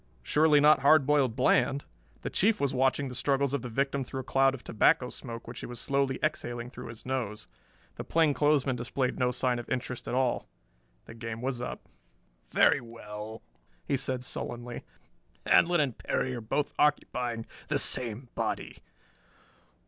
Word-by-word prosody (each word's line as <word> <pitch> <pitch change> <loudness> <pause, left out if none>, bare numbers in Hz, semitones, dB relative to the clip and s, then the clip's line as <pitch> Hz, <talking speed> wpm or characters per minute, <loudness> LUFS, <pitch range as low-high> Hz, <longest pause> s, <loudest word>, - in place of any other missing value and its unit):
Surely 150 - +4
not 150 +1 +6
Hard 140 +1 +5
Boiled 140 -5 +2
Bland. 130 +2 +2 0.4
The - - -3
Chief 210 +3 +2
was 140 -2 0
watching 135 +2 +1
the 125 - -7
struggles 140 +1 +1
of 140 - 0
the 125 - -6
victim 135 +3 0
through 130 +1 -5
a - - -11
cloud 135 +1 +3
of 125 - -12
tobacco 125 +3 +3
smoke 115 -2 -8
which 120 - -7
he - - -6
was 120 -1 -7
slowly 140 -1 0
exhaling 120 -5 -2
through - - -9
his 115 -1 -10
nose. 115 -5 -3 0.5
The - - -4
plainclothesman 145 -4 +2
displayed 125 +1 -2
no 125 -1 +3
sign 125 0 0
of 120 - -8
interest 125 -1 -3
at - - -2
all. 130 -2 0 0.6
The - - -10
game 115 -1 -6
was 125 0 -2
up! 125 - -6 0.6
"Very - - +4
well," 110 -1 -9 0.4
he - - +1
said 130 -1 -1
sullenly. 120 -1 -4 0.6
"Handlon 175 0 +5
and 135 -6 +1
Perry 130 - -2
are 120 - -5
both 140 +7 -1
occupying 125 -6 +1 0.2
the - - +1
same 120 0 0
body." - - -3
130 Hz, 165 wpm, -29 LUFS, 120-140 Hz, 0.6 s, not